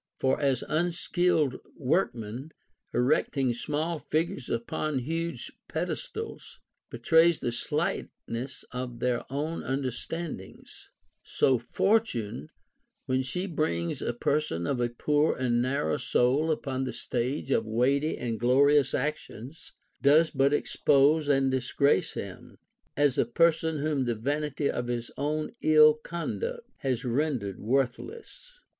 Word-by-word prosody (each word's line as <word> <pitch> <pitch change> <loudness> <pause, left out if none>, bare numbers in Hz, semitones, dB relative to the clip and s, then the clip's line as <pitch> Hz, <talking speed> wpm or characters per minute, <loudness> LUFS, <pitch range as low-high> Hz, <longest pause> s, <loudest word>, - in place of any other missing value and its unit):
For 135 +3 +1
as 135 -4 +1
unskilful 165 -3 +1 0.2
workmen, 125 - -1 0.4
erecting 130 0 +1
small 155 +6 -2
figures 160 -4 -2
upon 130 +5 -2
huge 165 +6 -3 0.2
pedestals, 450 -3 -5 0.3
betray 165 0 +4
the 120 -6 -3
slightness 120 +2 -3
of 125 -1 -5
their 125 -1 0
own 150 +4 -2
understandings; 135 - -5 0.3
so 130 -3 +2
Fortune, 120 - 0 0.6
Avhen 130 0 +1
she 180 +8 -3
brings 150 - -1
a - - -1
person 120 - -1
of 125 +4 -1
a 120 - +1
poor 150 +6 +1
and 120 -2 +1
narrow 125 - 0
soul 135 +6 +2
upon 135 -4 -1
the 130 - -4
stage 130 +3 -2
of 110 -4 +2
weighty 135 +7 +1
and 115 -3 -3
glorious 140 +3 +4
actions, 150 -1 -5 0.3
does 155 +4 +5
but 135 0 +3
expose 145 +1 +3
and 135 -2 +3
disgrace 130 +2 +1
him, - - -8 0.4
as 145 -3 +3
a - - +4
person 160 +3 +2
whom 145 -2 0
the 120 -1 0
vanity 145 +4 -1
of 120 - -2
his 120 -1 -3
own 150 +2 -2
ill 155 -1 +7
conduct 170 - -5
has 130 -2 -2
ren 140 +4 +1
dered 100 -4 -6
worthless. 430 - -3
140 Hz, 125 wpm, -28 LUFS, 125-155 Hz, 0.6 s, ill